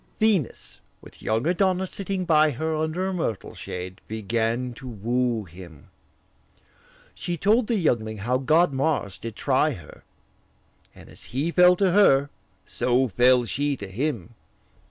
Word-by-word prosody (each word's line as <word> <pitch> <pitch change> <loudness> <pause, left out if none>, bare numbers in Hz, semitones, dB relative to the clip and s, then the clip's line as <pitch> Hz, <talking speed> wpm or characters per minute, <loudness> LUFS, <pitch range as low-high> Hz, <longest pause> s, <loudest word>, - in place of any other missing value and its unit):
Venus, 210 - 0 0.2
with - - -16
young 110 +4 -1
Adonis 185 +1 +1
sitting 195 -2 -3
by 155 -2 +4
her 155 +4 -2
Under 160 +4 -1
a 190 - -2
myrtle 135 - -3
shade, 90 +1 -7
began 115 +3 -2
to 130 - -11
woo 120 +1 -1
him: 85 -3 -14 1.2
She 175 -1 -4
told 215 +6 +2
the 235 - +1
youngling 115 - 0
how 120 +5 -1
god 155 +4 +3
Mars 135 -8 -1
did 115 -1 -7
try - - +1
her, - - -13 0.9
And - - -14
as - - -14
he 140 +7 -2
fell 180 +1 +6
to 190 0 +2
her, 145 -8 +4 0.3
so 125 +1 +1
fell 125 +4 +4
she 140 +4 -1
to 100 - -7
him. 120 - -3
135 Hz, 145 wpm, -24 LUFS, 115-175 Hz, 1.2 s, fell